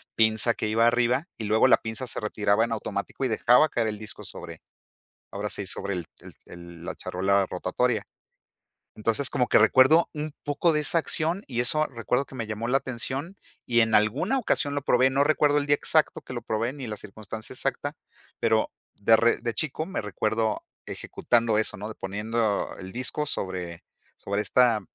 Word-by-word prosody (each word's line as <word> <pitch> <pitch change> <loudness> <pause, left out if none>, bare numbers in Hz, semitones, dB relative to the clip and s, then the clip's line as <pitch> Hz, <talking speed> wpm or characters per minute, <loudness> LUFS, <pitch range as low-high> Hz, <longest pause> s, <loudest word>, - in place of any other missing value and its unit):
pinza 110 +1 +3
que - - -2
iba 115 +2 +3
arriba, 125 +6 +1
y 115 - -6
luego 110 +4 +4
la - - +6
pinza 110 +3 -4
se - - -3
retiraba 105 0 +1
en 115 - -7
automático 110 +3 -4
y - - +2
dejaba 125 +5 +4
caer 115 -4 0
el 105 -1 -4
disco 110 -1 -8
sobre, 85 -3 -9 0.7
ahora 105 +1 -4
sí, 100 -1 -4
sobre 100 +1 -3
el 90 -3 -4
el - - -13
el 85 -1 -12
la - - -5
charola 95 +2 0
rotatoria. 105 +5 -1 0.9
Entonces, 115 +5 +2
como 125 - 0
que - - +4
recuerdo 130 +9 +5
un 155 0 -4
poco 145 +3 +1
de 150 - +1
esa 160 +3 +2
acción, 165 +4 -1
y 120 -2 -1
eso 155 +4 +4
recuerdo 125 +3 -1
que 135 - -13
me 115 -3 -4
llamó 110 +1 -4
la 130 +3 +3
atención, 135 - -3 0.3
y 120 -1 +2
en 110 -1 +2
alguna 135 - +2
ocasión 145 - 0
lo 145 - -1
probé. 130 -1 +3
No 140 +1 +3
recuerdo 145 -1 +3
el 145 - -2
día 145 - +4
exacto - - +1
que - - -9
lo - - -4
probé 115 +3 -2
ni 135 -4 -7
la 105 -1 -5
circunstancia 110 +2 -8
exacta, - - -2 0.5
pero 110 -1 +2 0.2
de 110 +2 +4
re 115 +1 +3
de 115 -1 -2
chico 155 +3 -2
me 190 - -4
recuerdo 110 +2 -1 0.2
ejecutando 115 -2 0
eso, 110 - +1
¿no? 105 +2 -6
De 110 - -8
poniendo 105 +2 -2
el 95 0 -8
disco 130 +4 -1
sobre 90 - -4 0.3
sobre 100 +1 -3
esta 120 -1 +3
115 Hz, 190 wpm, -26 LUFS, 105-135 Hz, 0.9 s, la